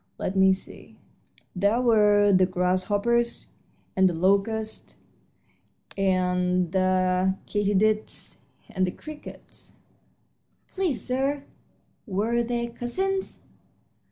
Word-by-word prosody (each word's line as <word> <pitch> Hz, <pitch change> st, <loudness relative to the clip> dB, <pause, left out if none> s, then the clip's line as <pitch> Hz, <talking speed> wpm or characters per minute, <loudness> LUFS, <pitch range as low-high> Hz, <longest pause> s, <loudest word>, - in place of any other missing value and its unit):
Let 190 Hz, -, -3 dB
me 190 Hz, 0 st, +5 dB
see 190 Hz, -, -7 dB, 0.6 s
there 200 Hz, +5 st, +2 dB
were 210 Hz, -4 st, +4 dB
the 185 Hz, -1 st, +4 dB
grasshoppers 200 Hz, +6 st, 0 dB, 0.5 s
and 190 Hz, -1 st, +4 dB
the 175 Hz, -, -4 dB
locusts 200 Hz, +5 st, -1 dB, 1.0 s
and 180 Hz, -2 st, +1 dB
the 185 Hz, 0 st, +1 dB
katydids 205 Hz, +1 st, -1 dB, 0.3 s
and 185 Hz, -3 st, 0 dB
the -, -, -2 dB
crickets." 305 Hz, +6 st, -12 dB, 0.9 s
"Please, 365 Hz, -9 st, -2 dB
sir, 270 Hz, +3 st, -1 dB, 0.6 s
were 220 Hz, +4 st, 0 dB
they 235 Hz, 0 st, -2 dB
cousins?" 380 Hz, +12 st, -3 dB
205 Hz, 90 wpm, -25 LUFS, 185-235 Hz, 1.0 s, me